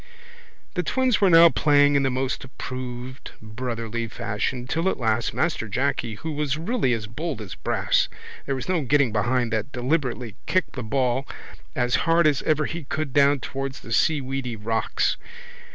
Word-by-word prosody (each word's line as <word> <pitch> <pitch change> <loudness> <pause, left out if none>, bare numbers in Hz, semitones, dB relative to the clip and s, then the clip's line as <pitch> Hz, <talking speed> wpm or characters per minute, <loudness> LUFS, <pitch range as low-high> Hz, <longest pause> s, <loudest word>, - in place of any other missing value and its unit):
The 180 - 0
twins 255 +5 +1
were 195 - +6
now 165 0 +9
playing 145 -2 +4
in 140 - +4
the 135 - +2
most 130 +1 -2
approved 130 0 -7
brotherly 115 0 -4
fashion 110 +4 -3
till 165 +8 0
at - - -2
last 110 -1 +1
Master 160 -9 -1
Jacky 120 0 -1
who 160 +9 -5
was 150 -1 -1
really 170 - 0
as 110 -2 -2
bold 145 +4 -4
as 105 -4 -7
brass - - +1 0.4
there 135 - 0
was 130 - -5
no 180 -3 +1
getting 140 -2 +3
behind 120 +2 +1
that 110 +5 -1
deliberately 125 -3 -1
kicked 185 - +1
the 130 - -5
ball 130 +2 0 0.5
as 120 -2 +2
hard 170 0 +5
as 150 -3 +3
ever 155 -1 +3
he 160 -1 -5
could 155 -1 -3
down 140 -1 +4
towards 135 0 -5
the 115 - -10
seaweedy 135 -3 0
rocks. 110 +1 0
130 Hz, 170 wpm, -24 LUFS, 120-150 Hz, 0.5 s, now